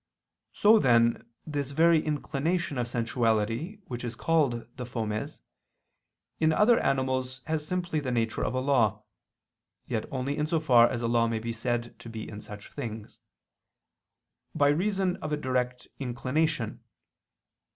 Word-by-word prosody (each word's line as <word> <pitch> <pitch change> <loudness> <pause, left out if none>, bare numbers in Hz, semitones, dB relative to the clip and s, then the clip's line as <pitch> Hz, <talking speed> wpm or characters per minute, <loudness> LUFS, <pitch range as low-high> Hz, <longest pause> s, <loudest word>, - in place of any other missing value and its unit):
So, 215 +2 +5
then, 115 -2 +3 0.2
this 145 -3 -3
very 160 +2 +4
inclination 155 +1 -1
of 120 - -1
sensuality 115 - 0
which 120 -1 -6
is 120 -1 -4
called 140 -6 +1
the 130 - -5
fomes, 110 -3 -4 1.0
in 160 0 +4
other 215 +8 +5
animals 130 -1 0
has 155 -1 -2
simply 175 -3 -1
the 140 -3 -3
nature 115 -2 0
of - - -1
a 130 - +1
law 130 -6 +2 0.8
(yet 110 - -2
only 135 +2 -2
in 150 - +1
so 165 0 +1
far 120 -6 +6
as 120 -2 -3
a - - +1
law 115 0 +3
may 115 -1 -1
be 115 +1 -4
said 120 +1 -3
to 115 - -10
be 110 -1 -6
in 105 -1 -8
such 105 0 -10
things), 115 -6 -7 1.4
by 145 0 +4
reason 190 +3 +1
of 155 -5 -5
a 150 - +1
direct 125 -2 -2
inclination. 130 +1 -1
130 Hz, 150 wpm, -28 LUFS, 115-155 Hz, 1.4 s, far